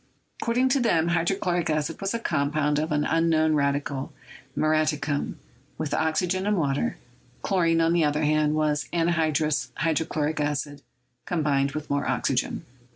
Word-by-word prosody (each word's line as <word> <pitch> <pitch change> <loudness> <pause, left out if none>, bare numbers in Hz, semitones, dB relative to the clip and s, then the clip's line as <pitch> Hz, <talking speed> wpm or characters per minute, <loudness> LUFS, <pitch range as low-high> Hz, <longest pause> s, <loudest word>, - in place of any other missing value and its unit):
According 245 +3 +2
to 270 - +2
them, 170 -9 +2
hydrochloric 175 0 0
acid 155 +2 -1
was 195 0 -1
a - - +1
compound 150 -6 0
of 155 +1 -2
an 150 0 +1
unknown 160 -1 +2
radical, 140 -1 -1 0.5
"muriaticum," 155 -2 0 0.4
with 155 -2 -3
oxygen 175 +5 0
and 210 -1 +2
water; 140 -4 0 0.5
chlorine, 165 -3 +2
on 165 +1 +3
the 170 -1 +3
other 150 +1 +1
hand, 150 0 +2
was 150 -1 0
anhydrous 155 -6 +1
hydro 160 -1 0
chloric 155 0 -1
acid 145 -1 -2 0.5
combined 140 -5 +1
with 155 -1 -5
more 140 0 0
oxygen. - - -1
155 Hz, 145 wpm, -25 LUFS, 150-165 Hz, 0.5 s, on